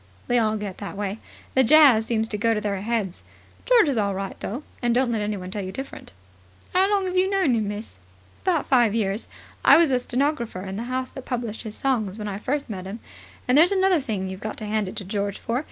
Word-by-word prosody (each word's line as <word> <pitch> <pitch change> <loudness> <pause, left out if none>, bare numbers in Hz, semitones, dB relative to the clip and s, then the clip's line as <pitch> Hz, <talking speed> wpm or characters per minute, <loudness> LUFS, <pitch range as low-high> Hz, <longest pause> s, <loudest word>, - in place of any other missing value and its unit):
They 245 0 +2
all 220 -1 +1
get 205 -3 -6
that 200 -1 -6
way. 205 +1 -3 0.3
The 260 - +4
jazz 260 -5 +6
seems 225 -1 0
to 210 - -2
go 230 +1 +2
to - - 0
their 200 -2 -2
heads. 210 -4 -2 0.5
George 485 -8 +6
is 265 -6 +1
all 200 -2 0
right, 195 0 -4
though, 250 +8 -5 0.2
and 240 -1 +1
don't 250 -1 +2
let 225 -2 0
anyone 200 -3 -3
tell 205 0 -3
you 185 - -5
different." 270 +7 -8 0.6
"Have 375 +2 +4 0.3
you 370 +1 +3
know 390 -1 +1
him 270 - +3
long, 220 -3 0
miss?" 205 - -6 0.4
"About 345 -5 +1
five 240 -5 +4
years. 205 -1 -1 0.4
I - - +8
was 330 -4 +4
a 255 - +3
stenographer 250 -6 -1
in 190 0 -5
the 225 +4 -4
house 255 0 -2
that 265 - -9
published 235 -4 -3
his 220 -2 -7
songs 220 -7 -1
when 210 -1 -5
I 200 -1 -4
first 280 +6 -2
met 190 -5 -6
him. 205 +4 -6 0.5
And 250 - +3
there's 330 +6 +6
another 380 -3 +3
thing 210 -7 -3
you've 190 0 -6
got 215 +1 -5
to 215 - -6
hand 210 -2 -1
it - - -9
to 205 -3 -6
George 200 0 -2
for. 235 +2 -2
225 Hz, 235 wpm, -24 LUFS, 205-260 Hz, 0.6 s, I